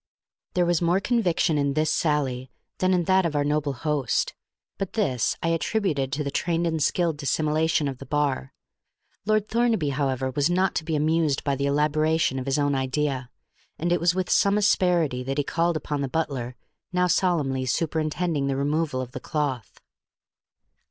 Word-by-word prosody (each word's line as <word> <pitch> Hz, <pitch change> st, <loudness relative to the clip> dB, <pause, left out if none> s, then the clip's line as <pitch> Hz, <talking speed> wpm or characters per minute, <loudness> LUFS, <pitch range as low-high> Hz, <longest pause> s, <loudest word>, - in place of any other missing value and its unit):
There 180 Hz, -1 st, +3 dB
was 175 Hz, -1 st, +1 dB
more 175 Hz, +2 st, +3 dB
conviction 185 Hz, -9 st, +1 dB
in 140 Hz, -1 st, 0 dB
this 155 Hz, 0 st, +2 dB
sally 135 Hz, -5 st, 0 dB, 0.3 s
than 185 Hz, 0 st, +2 dB
in 180 Hz, -2 st, +2 dB
that 190 Hz, +2 st, +3 dB
of 165 Hz, -3 st, -1 dB
our 145 Hz, -, +2 dB
noble 145 Hz, -1 st, 0 dB
host; 145 Hz, -1 st, -1 dB, 0.5 s
but 195 Hz, -, -3 dB
this 130 Hz, -, 0 dB
I 165 Hz, -, +1 dB
attributed 165 Hz, -5 st, 0 dB
to 150 Hz, -, -1 dB
the 140 Hz, -, -3 dB
trained 170 Hz, +3 st, 0 dB
and 160 Hz, -2 st, -1 dB
skilled 165 Hz, +1 st, +1 dB
dissimulation 155 Hz, +1 st, +1 dB
of 135 Hz, -2 st, -5 dB
the 135 Hz, -, -10 dB
bar. 145 Hz, -3 st, -1 dB, 0.8 s
Lord 215 Hz, -1 st, +2 dB
Thornaby, 225 Hz, -9 st, +1 dB
however, 135 Hz, -2 st, -1 dB
was 145 Hz, +4 st, +1 dB
not 185 Hz, +1 st, +2 dB
to -, -, -2 dB
be 160 Hz, 0 st, -2 dB
amused 155 Hz, -1 st, +1 dB
by 140 Hz, -1 st, 0 dB
the 140 Hz, +1 st, -1 dB
elaboration 150 Hz, 0 st, +1 dB
of 130 Hz, -, -6 dB
his 135 Hz, -, +1 dB
own 145 Hz, -1 st, +1 dB
idea, 135 Hz, -1 st, -1 dB, 0.5 s
and 170 Hz, +2 st, -1 dB
it 175 Hz, -, +3 dB
was 175 Hz, +1 st, +2 dB
with 185 Hz, -1 st, -1 dB
some 200 Hz, +1 st, +4 dB
asperity 175 Hz, -9 st, +2 dB
that 135 Hz, +2 st, -3 dB
he 145 Hz, -, +2 dB
called 165 Hz, +3 st, 0 dB
upon 145 Hz, -1 st, -3 dB
the 135 Hz, -, -2 dB
butler, 130 Hz, -5 st, -2 dB, 0.4 s
now 180 Hz, 0 st, +2 dB
solemnly 150 Hz, -8 st, +1 dB
superintending 155 Hz, +1 st, -1 dB
the 135 Hz, -, 0 dB
removal 145 Hz, -1 st, 0 dB
of 125 Hz, -1 st, -7 dB
the -, -, -6 dB
cloth. 135 Hz, -8 st, -3 dB
150 Hz, 180 wpm, -25 LUFS, 140-170 Hz, 0.8 s, some